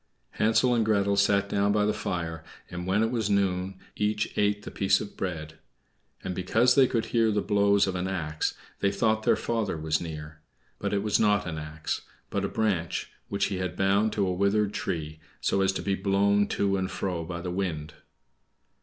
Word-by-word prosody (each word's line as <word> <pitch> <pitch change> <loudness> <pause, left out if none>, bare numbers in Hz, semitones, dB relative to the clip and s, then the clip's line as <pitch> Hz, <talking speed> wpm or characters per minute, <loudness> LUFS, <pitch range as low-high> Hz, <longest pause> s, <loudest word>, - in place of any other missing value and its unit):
Hansel 115 +3 +3
and 115 -2 +3
Gretel 100 -2 +2
sat 100 0 +3
down 100 0 +1
by 105 0 +2
the 105 - +1
fire, 85 -6 -3 0.3
and 90 0 -5
when 100 +4 +2
it 115 - 0
was 115 -4 0
noon 95 -1 0 0.2
each 105 0 -1
ate 105 0 +1
the - - -7
piece 95 - +2
of 100 - -7
bread; 80 -4 -5 0.6
and 95 - -3
because 110 +8 +3
they 130 0 +6
could 115 -2 0
hear 115 -2 +4
the 105 - +1
blows 100 -1 +3
of 95 - -2
an 90 0 -2
axe, 80 -5 -2 0.2
they 100 - +2
thought 110 +2 +1
their - - +3
father 115 -7 -1
was 80 0 0
near; 75 -2 -7 0.4
but - - -2
it 100 -1 0
was 105 -1 +2
not 105 -1 +3
an 80 -3 -4
axe, 75 0 -4 0.3
but - - -1
a - - +1
branch 95 -7 -1 0.2
which 100 -1 +1
he - - -2
had 90 -1 -3
bound 100 +3 +2
to 100 - +1
a 90 - 0
withered 100 +2 +1
tree, 80 -2 -3 0.2
so 95 - +1
as 95 - +3
to - - -4
be 100 - 0
blown 100 +1 +2
to 100 -1 0
and 95 0 -1
fro 90 -3 -3
by 85 +1 -5
the 90 0 -4
wind. 80 -5 -3
100 Hz, 200 wpm, -27 LUFS, 90-105 Hz, 0.6 s, they